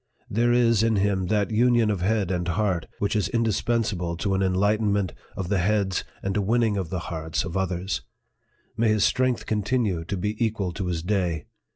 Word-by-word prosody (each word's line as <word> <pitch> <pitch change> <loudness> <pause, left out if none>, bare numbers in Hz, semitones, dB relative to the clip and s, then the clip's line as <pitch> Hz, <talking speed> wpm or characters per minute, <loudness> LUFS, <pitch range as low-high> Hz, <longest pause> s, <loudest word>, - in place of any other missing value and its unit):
There 120 +3 +2
is 115 -3 +4
in 115 -1 +2
him 95 -2 +1
that 105 +1 +1
union 120 -1 +3
of 100 -4 -2
head 100 -1 +1
and 90 -1 -1
heart, 90 -3 0
which 100 +2 -1
is 105 - +1
indispensable 110 -6 0
to 100 +3 -1
an 95 - +1
enlight 95 +3 +2
enment 100 -3 0 0.2
of 95 -2 -3
the 100 -2 +2
heads 95 0 +1 0.2
and 95 0 -1
a 105 - +2
winning 110 +1 +2
of 95 -5 -2
the 95 - -2 0.2
hearts 80 0 -2
of 85 - -6
others. 95 -5 -1 0.7
May 115 - +2
his 110 -2 +3
strength 130 -2 +1
continue 105 -4 0
to 100 +3 -3
be 105 +5 -1
equal 105 -5 -1
to 95 +1 -3
his 85 -2 -2
day 90 -5 -1
100 Hz, 195 wpm, -25 LUFS, 90-110 Hz, 0.7 s, is